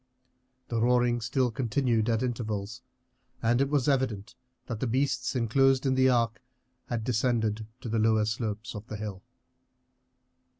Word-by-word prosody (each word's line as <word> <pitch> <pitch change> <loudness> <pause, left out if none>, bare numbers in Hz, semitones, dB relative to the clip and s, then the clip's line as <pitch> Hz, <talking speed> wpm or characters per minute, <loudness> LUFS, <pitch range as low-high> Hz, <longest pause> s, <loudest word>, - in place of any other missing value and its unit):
The 115 -2 0
roaring 120 0 +3
still 125 +2 0
continued 120 -2 0
at 115 +1 +1
intervals, 110 -2 -3 0.6
and 120 +3 +2
it 140 - +1
was 145 -3 +1
evident 130 -8 0 0.3
that 120 -4 -5
the 130 - -1
beasts 135 +3 0
inclosed 135 +3 +3
in 135 - +3
the 130 0 +4
arc 115 -2 +1 0.5
had 120 -2 -2
descended 110 -2 0
to - - -6
the 115 0 0
lower 110 -1 +3
slopes 110 0 -3
of 105 0 -8
the 110 - -5
hill. 100 -3 -6
115 Hz, 145 wpm, -28 LUFS, 110-130 Hz, 0.6 s, the